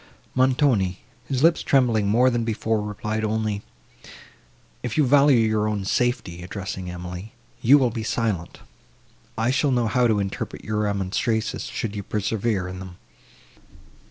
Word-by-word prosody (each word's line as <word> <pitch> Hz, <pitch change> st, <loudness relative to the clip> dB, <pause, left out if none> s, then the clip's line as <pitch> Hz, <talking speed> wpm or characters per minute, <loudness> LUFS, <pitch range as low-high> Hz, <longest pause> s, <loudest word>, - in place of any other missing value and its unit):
Montoni, 130 Hz, -, +2 dB, 0.3 s
his 135 Hz, 0 st, -1 dB
lips 165 Hz, +1 st, +5 dB
trembling 120 Hz, -6 st, +2 dB
more 125 Hz, +5 st, +4 dB
than 120 Hz, -1 st, 0 dB
before, 110 Hz, -1 st, -1 dB
replied 105 Hz, +1 st, -3 dB
only, 110 Hz, -1 st, -1 dB, 1.2 s
"If 120 Hz, +1 st, -4 dB
you 150 Hz, -, +4 dB
value 140 Hz, 0 st, +5 dB
your 110 Hz, -2 st, +2 dB
own 105 Hz, -2 st, -2 dB
safety," 100 Hz, -7 st, -1 dB
addressing 95 Hz, +1 st, -5 dB
Emily, 90 Hz, +5 st, -7 dB, 0.3 s
"you 135 Hz, +5 st, +7 dB
will 130 Hz, -4 st, +2 dB
be 115 Hz, 0 st, -4 dB
silent. 110 Hz, -6 st, -2 dB, 0.8 s
I 115 Hz, +2 st, +1 dB
shall 145 Hz, +2 st, +2 dB
know 125 Hz, -3 st, +2 dB
how 120 Hz, +3 st, +2 dB
to 110 Hz, -3 st, +2 dB
interpret 100 Hz, -1 st, -4 dB
your 105 Hz, 0 st, -1 dB
remonstrances, 105 Hz, +2 st, -1 dB
should 110 Hz, -2 st, -4 dB
you 100 Hz, -, -3 dB
persevere 105 Hz, -1 st, -1 dB
in 90 Hz, 0 st, -7 dB
them." 95 Hz, -1 st, -9 dB
110 Hz, 145 wpm, -24 LUFS, 100-125 Hz, 1.2 s, you